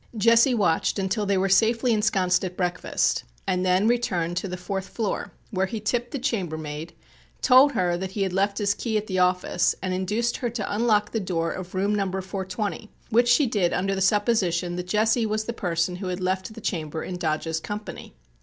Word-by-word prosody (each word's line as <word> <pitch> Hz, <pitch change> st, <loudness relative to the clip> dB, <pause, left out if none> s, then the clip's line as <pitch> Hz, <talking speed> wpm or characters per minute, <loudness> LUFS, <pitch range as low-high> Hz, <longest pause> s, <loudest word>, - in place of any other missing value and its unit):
Jesse 230 Hz, +4 st, +5 dB
watched 180 Hz, -5 st, +1 dB
until 200 Hz, +2 st, -1 dB
they 200 Hz, -1 st, +2 dB
were 190 Hz, +1 st, +2 dB
safely 225 Hz, +5 st, +3 dB
ensconced 195 Hz, -4 st, +2 dB
at 180 Hz, -1 st, -5 dB
breakfast 180 Hz, -1 st, 0 dB, 0.2 s
and 180 Hz, 0 st, 0 dB
then 185 Hz, +3 st, +3 dB
returned 185 Hz, -8 st, 0 dB
to 190 Hz, -, -2 dB
the 180 Hz, 0 st, -5 dB
fourth 190 Hz, +1 st, -4 dB
floor 220 Hz, -4 st, -3 dB, 0.2 s
where 190 Hz, -2 st, 0 dB
he 225 Hz, +2 st, -4 dB
tipped 240 Hz, +3 st, -1 dB
the 280 Hz, -, -4 dB
chambermaid, 165 Hz, -, -3 dB, 0.5 s
told 265 Hz, +3 st, +6 dB
her 175 Hz, -1 st, +1 dB
that 190 Hz, +1 st, -4 dB
he 200 Hz, -, 0 dB
had 190 Hz, -2 st, -2 dB
left 200 Hz, +1 st, +1 dB
his 205 Hz, -2 st, +1 dB
key 220 Hz, 0 st, -2 dB
at 210 Hz, -, -2 dB
the 185 Hz, -3 st, -2 dB
office 180 Hz, -1 st, +2 dB
and 185 Hz, -1 st, -2 dB
induced 210 Hz, +6 st, -1 dB
her 240 Hz, -, -2 dB
to 215 Hz, -3 st, -3 dB
unlock 210 Hz, -2 st, +2 dB
the 225 Hz, -, -1 dB
door 170 Hz, -4 st, -1 dB
of 185 Hz, 0 st, -7 dB
room 200 Hz, +2 st, +1 dB
Number 195 Hz, -2 st, -1 dB
420, 190 Hz, +3 st, -4 dB, 0.2 s
which 240 Hz, +2 st, +4 dB
she 260 Hz, +5 st, +5 dB
did 205 Hz, -7 st, +1 dB
under 195 Hz, +2 st, 0 dB
the 195 Hz, -, -2 dB
supposition 190 Hz, -4 st, +1 dB
that 180 Hz, 0 st, -5 dB
Jesse 220 Hz, +4 st, +2 dB
was 215 Hz, 0 st, -1 dB
the 235 Hz, -, -3 dB
person 180 Hz, -3 st, -1 dB
who 190 Hz, 0 st, -5 dB
had 180 Hz, 0 st, -3 dB
left 185 Hz, +3 st, -2 dB
the 225 Hz, +1 st, -10 dB
chamber 160 Hz, -5 st, -3 dB
in 180 Hz, -, -5 dB
Dodge's 160 Hz, -1 st, -1 dB
company. 205 Hz, -, -7 dB
195 Hz, 200 wpm, -25 LUFS, 180-220 Hz, 0.5 s, told